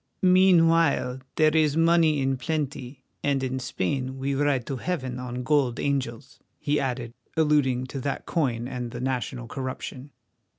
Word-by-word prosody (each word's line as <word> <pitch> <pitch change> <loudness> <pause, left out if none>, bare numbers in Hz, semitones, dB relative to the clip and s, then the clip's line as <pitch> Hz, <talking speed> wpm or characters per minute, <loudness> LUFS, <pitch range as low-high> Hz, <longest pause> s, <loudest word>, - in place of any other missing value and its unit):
"Meanwhile, 165 -8 +4 0.2
there 155 0 +3
is 155 -1 +3
money 165 -3 +4
in 135 0 +1
plenty, 140 -1 -4 0.2
and 140 -2 +1
in 130 0 -2
Spain 130 +2 -2
we 135 +1 -1
ride 135 -3 +1
to 135 - -4
heaven 130 -6 -3
on 125 0 -5
gold 135 -3 +1
angels," 130 -2 -3 0.2
he 150 +1 0
added, 125 -3 -3 0.2
alluding 145 -5 +2
to 130 +1 -6
that 140 +1 -3
coin 125 -7 -1
and 125 -2 -4
the 120 - -7
national 125 -1 -3
corruption. 130 +1 -6
135 Hz, 145 wpm, -26 LUFS, 125-150 Hz, 0.2 s, Meanwhile